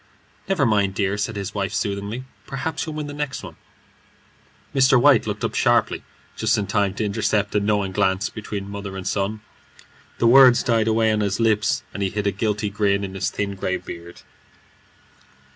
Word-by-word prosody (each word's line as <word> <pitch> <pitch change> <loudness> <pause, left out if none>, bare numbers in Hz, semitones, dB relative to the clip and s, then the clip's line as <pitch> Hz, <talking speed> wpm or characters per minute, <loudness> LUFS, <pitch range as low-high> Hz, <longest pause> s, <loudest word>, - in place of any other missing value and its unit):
"Never 180 -8 +2
mind, 100 -4 +2
dear," 100 -1 0
said 105 +2 -3
his 100 -1 -4
wife, 100 -2 -2
soothingly; 100 +4 -3 0.2
"perhaps 135 +5 -3
you'll 155 - -5
win 155 -1 -3
the 145 - -7
next 145 -2 -4
one." - - -9 1.2
Mr. 130 -2 +5
White 135 -2 +5
looked - - -4
up - - -1
sharply, - - +2 0.3
just 110 +1 +1
in 105 - -1
time 100 -1 0
to 110 - -1
intercept 105 0 0
a 105 - +3
knowing 100 -1 0
glance 95 +1 +1
between 105 -2 -6
mother 100 -1 -6
and 95 - -5
son. 105 +2 -1 0.8
The - - +1
words 125 0 +7
died 115 -2 +2
away 110 0 +3
on 110 - +1
his 100 -1 -1
lips, 110 -2 +2
and 100 - -5
he 95 - +1
hid 105 +1 -3
a 100 - +2
guilty 105 +1 -1
grin 100 -1 +1
in 95 -1 -5
his 95 - -1
thin 100 -1 -3
grey 95 -1 -2
beard. 85 -1 -10
105 Hz, 185 wpm, -22 LUFS, 100-115 Hz, 1.2 s, words